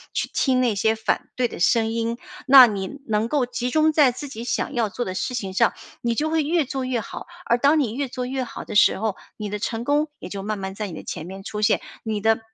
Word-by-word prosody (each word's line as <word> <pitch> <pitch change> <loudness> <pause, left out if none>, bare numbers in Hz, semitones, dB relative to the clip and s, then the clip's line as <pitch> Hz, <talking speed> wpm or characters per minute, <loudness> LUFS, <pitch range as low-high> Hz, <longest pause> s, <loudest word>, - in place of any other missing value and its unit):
去 - - 0
听 255 -2 +2
那 240 -4 +2
些 220 +3 +2
反 220 - -1
对 250 -1 +1
的 - - -9
声 225 +5 +3
音。 230 0 -1 0.3
那 260 -2 +10
你 210 +6 -4
能 215 0 +1
够 265 0 +1
集 245 0 -3
中 310 +3 +3
在 295 -5 +5
自 290 +4 -7
己 230 -3 -7
想 250 - -2
要 230 -3 0
做 245 - -3
的 185 - -4
事 260 +4 -2
情 195 -5 -4
上， 230 +4 +3 0.3
你 235 -1 0
就 305 +6 0
会 320 -1 +1
越 320 +1 +1
做 265 0 -3
越 250 -2 -1
好。 - - -8 0.2
而 235 - +3
当 285 +5 +4
你 240 -7 0
越 275 +3 -2
做 250 0 -4
越 260 +1 -2
好 240 - -7
的 215 - -7
时 205 - +5
候， 215 -1 -1 0.2
你 210 -2 -4
的 210 0 -4
成 225 +2 -3
功 295 +3 +2
也 - - -8
就 200 - -5
慢 215 +1 -2
慢 190 0 -4
在 210 0 -3
你 180 - -8
的 - - -8
前 155 - -6
面 190 +2 -9
出 210 +1 -5
现。 215 - +3 0.2
你 215 -2 -2
的 225 0 +3
235 Hz, 280 characters per minute, -23 LUFS, 210-265 Hz, 0.3 s, 那